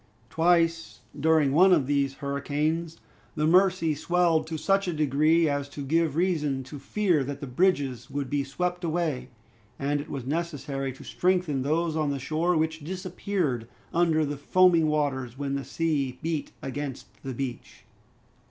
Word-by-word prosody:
Twice, 165 0 +1
during 155 -2 +3
one 185 +6 +6
of 155 -7 +4
these 140 -1 0
hurricanes, 150 +4 -2 0.4
the 150 -1 0
Mercy 180 -1 +4
swelled 165 0 +1
to 160 -1 -4
such 195 +5 +1
a 175 - -1
degree 155 +2 +3
as 145 -1 -1
to 145 0 -7
give 160 0 +1
reason 155 -6 0
to 140 +3 -9
fear 175 0 +1
that 140 +1 -5
the 145 - -5
bridges 140 -3 0
would 140 -1 -3
be 145 +1 0
swept 180 +6 -3
away, 160 -5 -1 0.5
and 145 +1 -1
it 145 - -11
was 135 -4 -5
necessary 140 -3 -3
to 130 - -12
strengthen 180 -7 0
those 160 +4 0
on 155 -2 0
the 140 - -1
shore, 160 +6 0
which 160 0 -1
disappeared 180 - -2 0.3
under 165 -2 +3
the 145 0 -4
foaming 170 +2 +4
waters, 135 -5 -1
when 140 -1 -3
the 140 0 -2
sea 140 -2 -1
beat 160 -2 -2
against 135 0 -5 0.2
the 130 -2 -5
beach. 125 -2 -6
155 Hz, 160 wpm, -27 LUFS, 140-170 Hz, 0.5 s, one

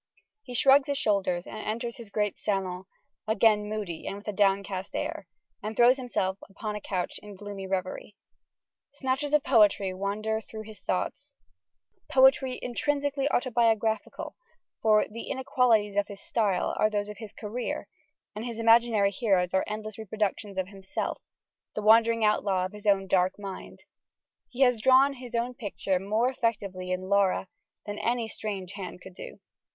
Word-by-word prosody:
He 250 -11 -8
shrugs 270 +3 +5
his 285 -1 -1
shoulders 190 -6 +1
and - - -8
enters 235 +3 -3
his 235 -4 -10
great 210 -1 0
salon, 190 -3 -2 0.4
again 215 -1 +3
moody 205 -7 -4
and - - -3
with 205 +2 -11
a 210 - -2
downcast 195 -1 0
air: 195 - -3 0.3
and 215 +1 -5
throws 245 +2 +6
himself 195 -7 -2
upon 210 +2 -5
a 210 - -5
couch 185 -3 -3
in 205 -1 -10
gloomy 200 -1 -7
reverie. 190 +2 -3 0.8
Snatches 270 +1 -1
of 300 -2 +4
poetry 205 -5 +4
wander 210 +3 -2
through 220 -1 -9
his 215 -2 -12
thoughts 280 +9 -3 0.8
poetry 265 -1 +5
intrinsically 285 +2 0
autobiographical, 225 -3 0 0.5
for 215 -1 +4
"the 230 +2 -8
inequalities 245 -6 +2
of 205 0 +1
his 200 -1 -9
style 200 -4 0
are 215 - +4
those 205 -1 -1
of 210 -1 -9
his 220 -3 -8
career," 230 +3 -4 0.5
and 210 - -5
his 235 -2 -5
imaginary 230 -3 +4
heroes 190 -4 +1
are 190 - +3
endless 215 0 -5
reproductions 210 -1 -2
of 190 0 -1
himself, 195 -1 -4 0.5
"the 215 - -3
wandering 225 +1 +5
outlaw 195 -3 +2
of 185 - -5
his 210 0 -8
own 195 -1 +4
dark 185 -1 +2
mind." 195 -2 -8 0.7
He 255 - -6
has 250 -4 +4
drawn 265 +3 +6
his 250 -2 -8
own 235 +2 0
picture 200 -5 -2
more 215 +6 +1
effectively 200 -7 -2
in 185 0 -1
Lara 195 -1 +2 0.4
than 205 0 -5
any 235 -1 0
strange 200 -4 -5
hand 190 -3 -7
could 185 0 -12
do. - - -10
210 Hz, 160 wpm, -28 LUFS, 195-235 Hz, 0.8 s, throws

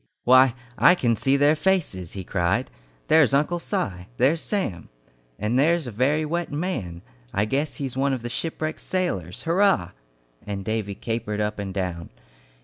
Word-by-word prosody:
"Why, 130 0 +6 0.2
I 180 - +7
can 120 -9 +1
see 135 +5 +2
their 145 +2 +4
faces!" 150 - -1
he 95 - -5
cried. 95 +7 0 0.4
"There's 150 -4 +5
Uncle 155 +5 +1
Si! 90 - -3
There's 145 +6 +3
Sam! 180 - -3 0.5
And 110 +5 0
there's 165 +2 +3
a 120 - -5
very 140 +8 +1
wet 170 +3 -2
man! 135 - -3 0.3
I 100 +2 +2
guess 140 +7 -1
he's 135 -3 -4
one 135 +1 +1
of 130 -3 -3
the - - -3
shipwrecked 155 +5 -3
sailors! 135 - -2
Hurrah!" 170 - +2 0.5
and 100 -2 -5
Davy 110 -2 -2
capered 110 -1 -3
up 105 0 -2
and 100 -1 -4
down. 90 -4 -4
125 Hz, 160 wpm, -24 LUFS, 100-155 Hz, 0.5 s, I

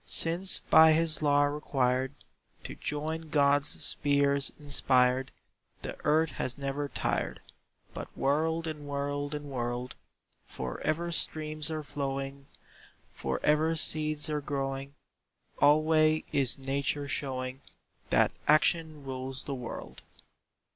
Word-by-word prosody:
Since 175 +3 +3
by 160 0 +8
his 160 -1 +3
law 145 -1 +3
required 135 -2 -1 0.5
To - - -7
join 155 +2 -4
God's 145 -1 +2
spheres 140 -1 +1
inspired, 130 -2 +1 0.5
The - - -5
earth 155 0 +2
has 125 0 -3
never 140 +1 -3
tired, - - -2 0.5
But - - -6
whirled 160 +4 0
and 150 -2 -6
whirled 145 +1 -3
and 145 -1 -7
whirled. 120 0 -3 0.5
For 65 -1 -6
ever 170 +3 -1
streams 155 -2 +4
are 155 -1 -4
flowing, 140 -1 -5 0.7
For - - -3
ever 155 +2 +2
seeds 155 -1 +2
are 150 -1 -2
growing, 135 -1 -4 0.7
Alway 155 +1 +4
is 130 -6 +4
Nature 140 +1 -2
showing 130 -1 -3 0.5
That - - +3 0.2
Action 155 0 +2
rules 130 0 -5
the 140 - -5
world. 125 -3 -8
145 Hz, 115 wpm, -29 LUFS, 135-155 Hz, 0.7 s, by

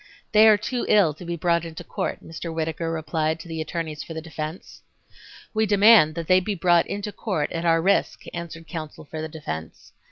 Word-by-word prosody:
"They 215 +1 +7
are 215 -1 +7
too 245 +4 -3
ill 195 -8 +5
to 155 - -12
be 170 0 -3
brought 170 0 +1
into 165 -1 -8
court," - - -4
Mr. 165 +1 -6
Whittaker 160 0 -2
replied 160 0 -1
to 160 - -10
the 160 -1 -4
attorneys 155 -1 -4
for 165 - -8
the - - -3
defense. 160 +1 -7 0.7
"We 220 0 +1
demand 205 -6 +6
that 170 -1 -4
they 185 +2 +5
be 200 +2 -3
brought 175 -1 +3
into 205 +1 -4
court 190 -9 -2
at 165 0 -3
our 165 -1 +3
risk," 200 +2 +1
answered 165 -1 -7
counsel 155 -2 -7
for 155 +2 -6
the 160 - -4
defense. 80 - -7
165 Hz, 200 wpm, -24 LUFS, 160-185 Hz, 0.7 s, They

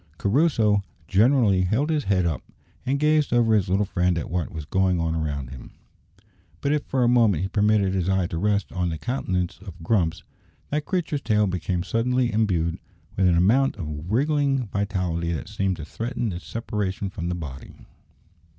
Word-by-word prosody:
Crusoe 110 -4 +2 0.3
generally 105 -1 +4
held 115 - +1
his 150 -3 0
head 95 -2 +2
up, 80 -6 -1 0.5
and 140 +2 +1
gazed 150 -1 +2
over 115 -2 +3
his 100 -4 +2
little 100 +3 +2
friend 90 -2 0
at 80 - -4
what 90 -2 -2
was 80 -2 -6
going 95 +1 +1
on 80 -1 0
around 70 -5 -3
him; 65 -2 -11 0.9
but 140 - 0
if 150 -1 0
for 130 -2 +1
a - - +4
moment 115 -8 +3
he - - 0
permitted 105 -2 +2
his 95 -1 0
eye 95 -2 +2
to 85 -1 -4
rest 105 0 0
on 90 -2 -1
the 80 - -3
countenance 90 - -2
of 90 -3 -11
Grumps, 85 -3 0 0.5
that 150 +1 -1
creature's 160 -6 -1
tail 105 -2 +2
became 90 -1 -2
suddenly 120 +3 0
imbued 90 -7 0 0.4
with 95 -1 +3
an 85 -1 +3
amount 120 +11 +3
of 75 -2 -6
wriggling 140 +1 +1
vitality 90 -4 -1
that 75 - -5
seemed 95 -2 -1
to 75 - -7
threaten 115 - -3
its 85 - -8
separation 100 -4 -3
from 85 -3 -4
the 90 - -1
body. 70 -6 -8
100 Hz, 180 wpm, -24 LUFS, 85-120 Hz, 0.9 s, generally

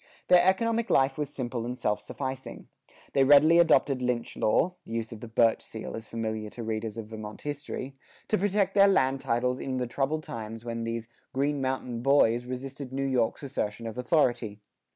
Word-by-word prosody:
Their 180 -1 +8
economic 230 +5 +2
life 135 0 +3
was 145 -2 -1
simple 120 -3 -4
and 125 +2 -5
self 105 - 0
sufficing. 130 -1 -6 0.5
They 135 - +4
readily 150 +5 +7
adopted 140 -5 +4
lynch 125 -1 -1
law 165 +11 +2
(the 115 - -9
use 115 -1 -3
of 115 - -8
the 120 - -8
"birch 115 0 +3
seal" 110 - -7
is 115 -1 -8
familiar 110 -2 -3
to 115 +2 -8
readers 110 0 -3
of 115 - -5
Vermont 110 -1 -8
history) 145 -2 -5 0.3
to 215 - +1
protect 200 0 +1
their 200 0 +6
land 135 -8 +2
titles 125 +2 0
in 130 -1 -3
the 125 - -1
troubled 140 +5 -1
times 115 -1 -7
when 115 -1 -3
these 115 0 -4 0.3
"Green 140 +1 0
Mountain 130 -3 -2
Boys" 120 -3 +3
resisted 130 +1 -6
New 135 +1 -2
York's 125 -1 0
assertion 115 -4 -3
of 115 - -5
authority. 120 -5 +1
125 Hz, 185 wpm, -28 LUFS, 115-140 Hz, 0.5 s, Their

